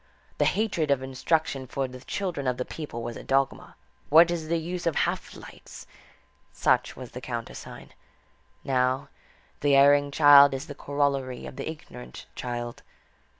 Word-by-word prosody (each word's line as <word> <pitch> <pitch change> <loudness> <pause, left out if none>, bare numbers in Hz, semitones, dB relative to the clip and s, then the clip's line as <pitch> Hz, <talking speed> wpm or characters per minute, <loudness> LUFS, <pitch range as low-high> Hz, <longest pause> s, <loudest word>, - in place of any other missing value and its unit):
The - - +4
hatred 195 -8 0
of 135 -2 +2
instruction 135 +1 -1
for 135 +1 -2
the 130 0 -10
children 165 -1 -4
of 125 -1 0
the 125 - -3
people 145 -7 -7
was 120 0 -5
a - - -9
dogma. 135 0 -1 0.3
What 165 +3 +7
is 165 -2 -3
the 170 +1 +1
use 175 +2 -4
of 165 - +1
"half - - -1
lights"? - - -12 0.7
Such - - +1
was 130 -2 -9
the 125 - -8
countersign. 120 -2 -7 0.7
Now, 130 0 0 0.5
the 145 -1 +3
erring 145 +1 +5
child 140 -1 +7
is 135 - -5
the 145 - -8
corollary 140 -3 -2
of - - -9
the - - -5
ignorant 65 - -10
child. 120 -1 -5
140 Hz, 155 wpm, -26 LUFS, 130-155 Hz, 0.7 s, What